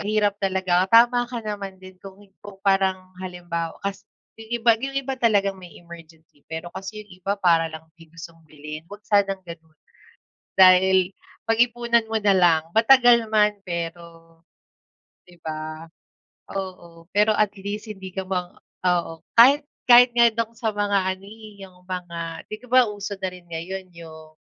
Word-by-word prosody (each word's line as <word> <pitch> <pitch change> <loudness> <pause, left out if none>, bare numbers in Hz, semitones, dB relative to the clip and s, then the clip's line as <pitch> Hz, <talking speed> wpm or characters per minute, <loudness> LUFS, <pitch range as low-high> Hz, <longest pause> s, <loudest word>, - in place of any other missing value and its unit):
mahirap 205 -1 0
talaga. 185 -2 +1
Tama 240 +1 +6
ka 245 -1 -5
naman 200 -3 -6
din 185 0 -13
kung 195 0 -12
hin 195 -1 -22
kung 205 -1 -11
parang 190 -1 +1
halimbawa 175 -2 -5
kas 200 0 -4 0.4
yung 220 0 -12
iba 235 0 +6
yung 270 +3 -5
iba 270 0 -4
talagang 205 -5 +2
may 180 -2 -13
emergency, 165 -3 -16
pero 160 +1 -5
kasi 215 +3 -7
yung 205 - -27
iba 195 - 0
para 165 -3 +2
lang 160 0 -10
may 165 -1 -16
gustong 165 0 -12
bilin. 150 +1 -9
Huwag 205 +1 -11
sanang 200 -2 +2
gano'n, 160 -2 -12 0.8
dahil 185 0 +5 0.3
pag-ipunan 235 0 +2
mo 225 - 0
na 205 -2 +3
lang. 170 -3 +4
Matagal 235 -1 +5
man 210 -1 +3
pero 165 -1 -7 0.9
di 175 - -17
ba? 155 0 -6 0.7
Oo, 175 -3 -8
pero 210 +2 +3
at 215 -1 +2
least 205 +3 -6
hindi 190 -2 -10
ka 190 - -3
ma 180 -2 -3 0.3
oo, 170 -2 -1
kahit 275 +5 +7 0.3
kahit 245 0 +8
nga 235 -1 +5
do'ng 230 0 -3
sa 225 -2 -1
mga 205 -1 +1 0.2
ano, 195 - -18
eh, 210 -1 -12
yung 180 -1 -21
mga 170 -3 -6
di 215 - -4
ka - - -14
ba 255 -1 +6
uso 205 0 -6
na 190 -1 -2
rin 180 - -13
ngayon 185 +3 -6
'yong, 160 -2 -13
190 Hz, 165 wpm, -23 LUFS, 170-215 Hz, 0.9 s, kahit